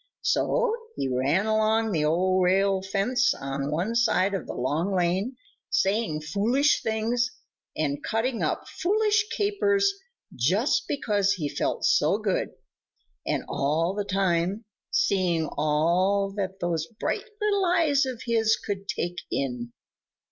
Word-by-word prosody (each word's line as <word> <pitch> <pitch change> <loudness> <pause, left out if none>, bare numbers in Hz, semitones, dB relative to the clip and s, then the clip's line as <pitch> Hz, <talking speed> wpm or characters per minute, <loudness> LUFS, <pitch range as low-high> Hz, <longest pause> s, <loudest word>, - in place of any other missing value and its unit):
So - - +1 0.2
he - - -2
ran 135 +10 +1
along 220 0 +2
the 155 -5 +1
old 185 +4 +2
rail 190 +1 +2
fence 205 +6 +1
on 135 +1 -4
one 175 +9 -1
side 205 -4 +2
of 195 - -3
the - - -5
Long 160 +10 -1
Lane, 185 +8 0 0.3
saying 195 -6 +1
foolish 225 - +2
things 230 +2 0 0.5
and 145 -2 -1
cutting 230 +2 -1
up - - -1
foolish 425 +2 +1
capers 405 -1 +1 0.4
just 185 - +1
because 205 -8 +1
he 165 -7 -3
felt - - -2
so - - +3
good, - - -1 0.8
and - - 0
all 160 +6 0
the 205 0 -2
time 190 +1 0 0.2
seeing 175 -4 +1
all 175 +7 +2
that 190 -2 -3
those 165 -2 -1
bright - - -2
little 405 -2 +1
eyes 325 -5 +3
of 255 -3 -4
his 225 -2 +3
could 195 -1 -5
take 175 -1 -3
in. 125 -3 -3
195 Hz, 135 wpm, -26 LUFS, 170-235 Hz, 0.8 s, so